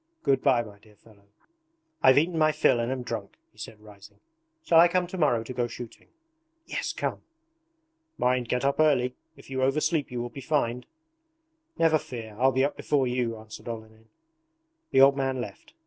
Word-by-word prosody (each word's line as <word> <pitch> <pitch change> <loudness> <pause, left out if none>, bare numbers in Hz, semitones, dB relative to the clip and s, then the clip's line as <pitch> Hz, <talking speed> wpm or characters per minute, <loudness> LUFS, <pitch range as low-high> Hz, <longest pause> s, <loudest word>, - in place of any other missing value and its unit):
Good 135 - +2
bye, 130 -4 +3
my 105 -2 -13
dear 105 0 -21
fellow. 100 -1 -22 0.7
I've 130 0 +6
eaten 165 +4 +2
my 155 -1 +3
fill 120 - +3
and 120 +2 -1
am 130 -1 -3
drunk,' 115 -5 -6
he 105 - -23
said 105 0 -9
rising. 105 -2 -16 0.4
'Shall 165 - +5
I 170 - +8
come 180 +1 +1
to 180 - -8
morrow 120 -8 +2
to 130 - -7
go 120 -1 -1
shooting?' 120 0 -10 0.6
'Yes, - - -3
come!' - - -3 1.0
'Mind, 125 -1 +1
get 125 +1 0
up 140 +2 +1
early; 130 -5 +3 0.2
if 140 - -15
you 130 0 -2
oversleep 150 +3 +1
you 125 -1 -4
will 120 0 -4
be 135 - -9
fined!' 125 -4 -1 0.9
'Never 160 -1 +3
fear, 115 -5 -8
I'll 130 +1 +4
be 130 +1 +2
up 145 - -3
before 140 -3 0
you,' 125 -2 -1
answered 110 +1 -12
Olenin. 110 -1 -8 0.8
The 135 - +4
old 135 +1 +7
man 135 -1 -1
left. 295 - -8
125 Hz, 185 wpm, -27 LUFS, 115-140 Hz, 1.0 s, I